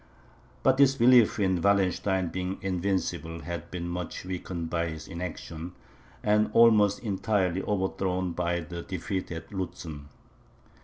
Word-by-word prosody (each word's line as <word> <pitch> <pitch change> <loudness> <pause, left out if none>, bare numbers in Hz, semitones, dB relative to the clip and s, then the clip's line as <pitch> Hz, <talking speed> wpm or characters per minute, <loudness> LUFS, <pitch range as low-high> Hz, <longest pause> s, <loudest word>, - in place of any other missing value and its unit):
But 130 0 +4
this 135 -1 +5
belief 120 -3 +5
in 95 -3 +2
Wallenstein's 95 -2 +2
being 95 +2 -3
invincible, 90 -3 -2
had 85 0 -6
been 85 -1 -4
much 90 0 -5
weakened 90 -2 -4
by 85 -1 0
his 80 -2 -7
inaction, 85 -1 -6 0.5
and 105 0 +3
almost 110 -4 +6
entirely 95 -3 0
overthrown 95 -2 -1
by 85 0 -1
the 85 +1 -6
defeat 95 +1 -4
at 80 0 -7
Lutzen. 85 -6 -5
90 Hz, 125 wpm, -28 LUFS, 85-100 Hz, 0.5 s, almost